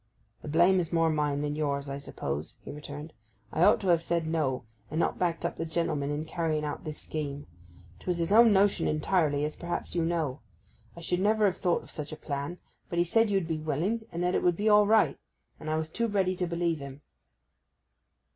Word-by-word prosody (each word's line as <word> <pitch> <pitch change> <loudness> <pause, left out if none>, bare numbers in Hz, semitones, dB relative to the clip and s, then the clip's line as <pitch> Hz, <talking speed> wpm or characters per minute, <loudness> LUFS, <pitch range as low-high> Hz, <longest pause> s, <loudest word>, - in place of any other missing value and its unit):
'The - - -9
blame 175 +5 +4
is 170 -2 -2
more 165 -1 +3
mine 150 -2 0
than 145 0 -2
yours, 140 -2 -1
I 140 0 -4
suppose,' 75 - -5
he - - -6
returned. 150 +1 -8 0.4
'I 160 - 0
ought - - +5
to 190 - -1
have 170 -2 +4
said 170 -1 -1
No, 155 -6 0 0.3
and 155 - -2
not - - 0
backed 170 -2 0
up 170 - -2
the - - -2
gentleman 160 -3 -1
in 145 +2 -2
carrying 160 -2 -1
out 145 - -5
this 155 -1 -4
scheme. 145 -2 -4 0.5
'Twas 180 -1 -2
his 170 +2 -1
own 230 +1 +7
notion 200 0 +3
entirely, 150 -2 +1
as 150 - -4
perhaps 175 0 -4
you 170 - +1
know. 160 -5 -1 0.6
I - - -8
should 175 +2 -1
never 210 +2 +3
have 190 -2 +1
thought 175 -2 +1
of - - -14
such 150 -1 -6
a 155 - -6
plan; 145 +4 -4 0.3
but 170 - -3
he 175 - +3
said 225 +5 +3
you'd 195 -4 +1
be 160 -1 -2
willing, 175 +10 -1
and 170 +1 -3
that 180 +1 +1
it - - +2
would 175 -2 +2
be 210 - 0
all 210 -1 +6
right; 220 0 +3 0.4
and 155 - -6
I 155 - +1
was 160 0 -3
too 230 +5 0
ready 190 -3 +1
to 180 - -1
believe 170 -1 0
him. 140 0 -9
165 Hz, 220 wpm, -29 LUFS, 150-180 Hz, 0.6 s, own